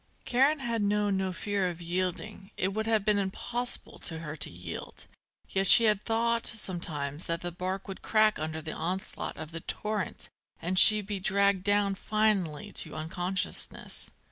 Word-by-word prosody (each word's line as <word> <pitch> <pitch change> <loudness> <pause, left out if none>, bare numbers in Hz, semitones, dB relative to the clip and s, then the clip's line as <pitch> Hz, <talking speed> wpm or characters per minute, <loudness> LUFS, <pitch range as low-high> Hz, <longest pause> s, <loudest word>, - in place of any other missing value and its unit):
Karen 270 +5 +3
had 235 -3 -1
known 205 0 +1
no 190 -1 -1
fear 195 +1 -1
of 170 -1 -7
yielding, 185 +3 -3
it 185 - +1
would 220 +3 -3
have 220 -3 +2
been 210 -1 +3
impossible 240 +5 -3
to 165 - -4
her 155 -2 -6
to - - 0
yield; 85 +1 -8 0.4
yet 195 0 +1
she 230 - +8
had 210 -2 +3
thought 230 +1 0
sometimes 165 -8 -3
that 165 -1 -1
the 175 - -4
bark 185 +2 -4
would 195 - -7
crack 215 -1 +3
under 155 0 -4
the 155 - -4
onslaught 180 +4 -4
of 155 - -7
the 165 - -6
torrent 210 +2 -4 0.3
and 185 +2 +3
she 215 -1 +10
be 200 0 -4
dragged 200 0 +2
down 205 0 +2
finally 205 -3 0
to 155 -5 -3
unconsciousness. 175 +4 -2
195 Hz, 170 wpm, -29 LUFS, 175-215 Hz, 0.4 s, she